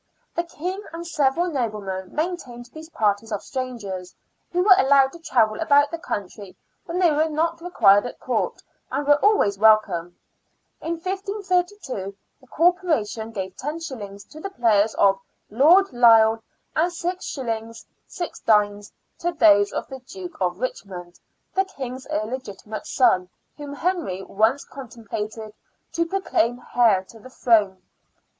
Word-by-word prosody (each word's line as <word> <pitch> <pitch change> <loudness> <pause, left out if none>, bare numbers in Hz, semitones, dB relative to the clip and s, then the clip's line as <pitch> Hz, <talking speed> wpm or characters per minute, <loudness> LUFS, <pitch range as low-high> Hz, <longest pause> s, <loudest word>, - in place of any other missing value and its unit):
The 340 - -1
King 360 +4 -5
and 335 +1 -6
several 315 +2 +1
noblemen 210 - -4
maintained 265 -8 -4
these 315 +1 -10
parties 215 -4 0
of 210 - -3
strangers, 220 -9 -5 0.4
who 360 0 +1
were 390 -1 +8
allowed 275 -5 +4
to 340 - -11
travel 230 -9 +1
about 290 -2 +4
the 335 - -4
country 200 - -6 0.3
when 345 -1 -4
they 355 -3 +4
were 310 +2 +1
not 330 +2 -1
required 220 - +4
at - - -10
Court, - - -2 0.3
and 290 - -2
were 290 0 +3
always 210 - +3
welcome. 200 -6 +3 0.6
In 330 - -2
1532 365 - -3 0.2
the 260 - -21
Corporation 315 - +1
gave 190 -3 -5
los. 260 -10 -6
to 305 - -14
the 390 - -5
players 220 - +2
of 195 -1 +3 0.3
Lord 320 - +5
Lisle 225 -2 +6 0.3
and 340 +3 +2
6s. 255 -11 -4 0.2
6d. 210 - 0 0.3
to 345 - -1
those 205 -8 +5
of - - -4
the 265 -1 -8
Duke 355 +6 -10
of 180 0 -1
Richmond, 180 -8 -6 0.3
the 385 +1 +2
King's 260 -8 -7
illegitimate 220 -5 -5
son, 185 -8 +2 0.3
whom 290 -1 -8
Henry 320 - -2
once 220 +9 +1
contemplated 220 -4 -7 0.4
to 335 0 0
proclaim 245 - 0 0.2
heir 220 -6 +4
to 225 +4 -16
the 255 - -13
throne. 210 -7 +2
255 Hz, 135 wpm, -23 LUFS, 210-330 Hz, 0.6 s, were